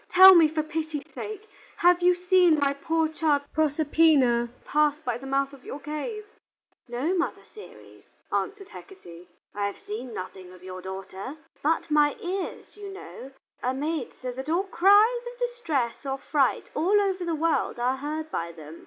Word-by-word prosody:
Tell 380 +1 +10
me, 335 -3 +7
for 310 0 -2
pity's 310 -1 -4
sake, 430 0 -7 0.3
have 355 0 +4
you 360 0 +5
seen 360 -2 +4
my 280 -1 +2
poor 320 +3 0
child 310 -2 +1
Proserpina 295 -5 +3 0.2
pass 300 -1 +2
by 245 -1 -2
the 270 - -9
mouth 275 +1 0
of 270 -2 -14
your 285 - -7
cave?" 305 - -5 0.7
"No, 255 +9 -1
Mother 350 - -2
Ceres," 430 - -15 0.3
answered 400 -1 -2
Hecate. 180 - -13 0.2
"I 205 0 -1
have 200 - -6
seen 235 +4 -7
nothing 185 -2 -8
of 180 0 -16
your 185 0 -8
daughter. 190 +7 -7 0.3
But 315 +1 0
my 295 -1 +4
ears, 370 +1 -5
you 405 -1 -8
know, 275 -8 -10 0.3
are 255 +1 -1
made 295 -1 -3
so 255 -1 -5
that 265 +4 -7
all 345 +4 +2
cries 410 +6 +4
of - - -16
distress 435 - -2
or 270 -1 -3
fright 275 -1 0
all 390 +6 +3
over 385 -2 0
the 335 -2 -1
world 325 -3 0
are 250 +2 0
heard 310 +3 -5
by 170 0 -3
them. 160 0 -11
300 Hz, 170 wpm, -26 LUFS, 255-355 Hz, 0.7 s, Tell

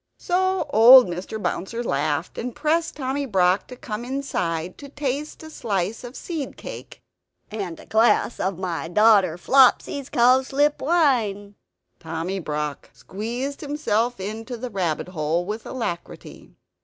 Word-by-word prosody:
So 375 -1 0
old 245 +4 +9
Mr. 180 +4 -5
Bouncer 230 +4 -3
laughed; 145 -1 -2
and 245 0 -5
pressed 320 +3 0
Tommy 275 0 -2
Brock 190 -3 +2
to 250 - -9
come 235 -4 -6
inside, 185 -11 -3
to 280 - -10
taste 290 +2 -4
a 315 - -10
slice 205 - -2
of 245 +2 -9
seed 320 -6 -5
cake - - -10 0.5
and 195 -6 -5
"a - - -13
glass 225 +2 +2
of 190 -2 -1
my 170 -4 -3
daughter 195 -2 +4
Flopsy's 265 +5 +3
cowslip 265 +4 +3
wine." 240 - +1 0.5
Tommy 165 +4 -4
Brock 150 -3 -4
squeezed 240 +8 -5
himself 245 -6 -1
into 225 +5 -5
the 245 +1 -6
rabbit 180 -4 -2
hole 165 0 -1
with 215 +3 -5
alacrity. 200 -9 -6
225 Hz, 135 wpm, -23 LUFS, 185-270 Hz, 0.5 s, old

